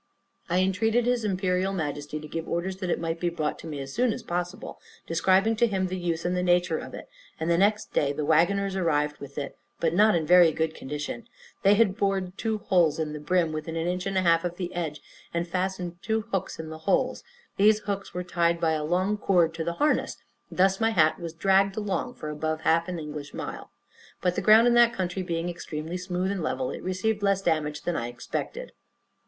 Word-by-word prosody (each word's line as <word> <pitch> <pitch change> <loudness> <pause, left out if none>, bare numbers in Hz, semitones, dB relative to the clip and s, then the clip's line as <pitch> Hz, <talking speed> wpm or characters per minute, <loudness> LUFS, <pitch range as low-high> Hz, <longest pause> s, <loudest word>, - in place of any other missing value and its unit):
I 175 - +1
intreated 220 +6 +2
his 245 -1 +1
Imperial 190 -1 0
Majesty 150 -3 -3
to 155 - -9
give 165 +2 -5
orders 185 +3 -2
it 180 -2 -1
might 165 0 -3
be 175 - 0
brought 155 -3 -3
to - - -9
me 150 -3 -5
as 135 0 -6
soon 245 0 +2
as 235 - -7
possible, 175 0 -4 0.2
describing 190 +6 +3
to 235 +1 +4
him 190 -3 0
the 185 0 -3
use 170 -2 -2
and 180 +1 0
the 180 - 0
nature 180 0 +2
of - - -8
it; - - -9 0.3
and 165 +2 0
the 170 - +3
next 210 +2 +1
day 140 -1 +2
the 145 +1 -3
wagoners 190 +5 +2
arrived 150 -5 0
with 140 0 -10
it, 140 -2 -4 0.2
but 165 -1 +1
not 210 +3 +5
in 165 - +1
a - - -5
very 175 0 +7
good 160 0 -1
condition; 150 - -6 0.3
they 200 +1 +5
had 205 -3 +3
bored 195 -3 -1
two 220 0 -1
holes 175 -6 +2
in 155 -2 -2
the 150 - -5
brim, 165 +2 +1
within 155 +1 -5
an 165 0 -1
inch 180 +2 -2
and 195 -1 -1
a 185 - +2
half 165 -1 +4
of 175 0 -3
the 180 -1 -4
edge, 155 -4 -4 0.3
and 170 +1 -1
fastened 180 -1 -3
two 220 0 0
hooks 195 -3 -2
in 160 -1 -6
the 160 0 -8
holes; 255 +6 +1 0.3
these 210 +2 +5
hooks 200 -2 -4
were 180 +1 -4
tied 170 -1 +1
by 165 -1 +2
a 155 -1 -1
long 185 +6 +1
cord 175 -5 +3
to 165 0 -3
the 170 - -2
harness, 295 - +1 0.3
and - - -11
thus 190 +1 +3
my 225 0 +3
hat 160 -7 +3
was 170 -2 -5
dragged 195 +3 +2
along 215 +4 -2
for 155 - -6
above 155 +1 -2
half 165 +1 +2
an 180 -1 -4
English 150 -2 -7
mile; - - -6 0.5
but, 180 - +1
the - - -2
ground 220 +2 +7
in 240 - +4
that 240 0 +5
country 185 0 -2
being 170 -1 -2
extremely 165 -1 -5
smooth 180 +1 -2
and 200 -3 -3
level, 130 -4 -2
it - - -6
received 205 +4 -1
less 195 -1 +1
damage 150 -3 0
than 175 - -1
I 120 - -2
expected. 120 0 -5
180 Hz, 225 wpm, -27 LUFS, 160-195 Hz, 0.5 s, very